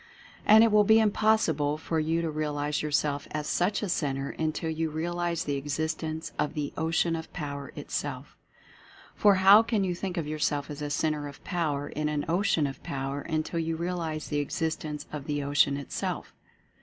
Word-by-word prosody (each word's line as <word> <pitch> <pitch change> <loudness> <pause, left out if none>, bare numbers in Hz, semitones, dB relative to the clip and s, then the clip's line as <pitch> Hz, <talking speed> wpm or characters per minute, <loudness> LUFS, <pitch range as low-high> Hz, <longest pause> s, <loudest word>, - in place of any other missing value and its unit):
And 220 +1 +9
it 230 - +4
will 210 0 +6
be 220 +2 +6
impossible 205 -9 +2
for 160 +1 -2
you 165 +2 0
to 165 - -1
realize 150 -1 -1
yourself 145 -1 0
as 150 0 -3
such 185 +7 0
a - - -1
Centre 140 -5 -1
until 160 +1 -2
you 160 0 -1
realize 170 +1 -2
the 145 -1 -1
exist 150 +3 -2
ence 160 0 -4
of 150 +1 0
the 145 -2 -3
Ocean 165 +1 +1
of 160 0 -6
Power 140 -3 -5
itself. - - -5 0.8
For 205 -1 +5
how 195 +3 +8
can 225 -3 0
you 185 -2 0
think 180 +1 -4
of 165 - -1
yourself 150 -1 -1
as 145 0 -7
a 145 - -2
Centre 150 0 0
of 140 - -11
Power, 150 -6 -1
in 150 0 -2
an 150 -1 -1
Ocean 170 -2 +2
of 135 -1 -5
Power, 135 +1 -3
until 160 +1 -2
you 165 0 -1
realize 165 -2 -3
the 145 - 0
existence 150 0 -3
of 145 -2 -5
the 145 -1 -2
Ocean 140 0 +3
itself? 140 - -4
155 Hz, 185 wpm, -28 LUFS, 145-170 Hz, 0.8 s, And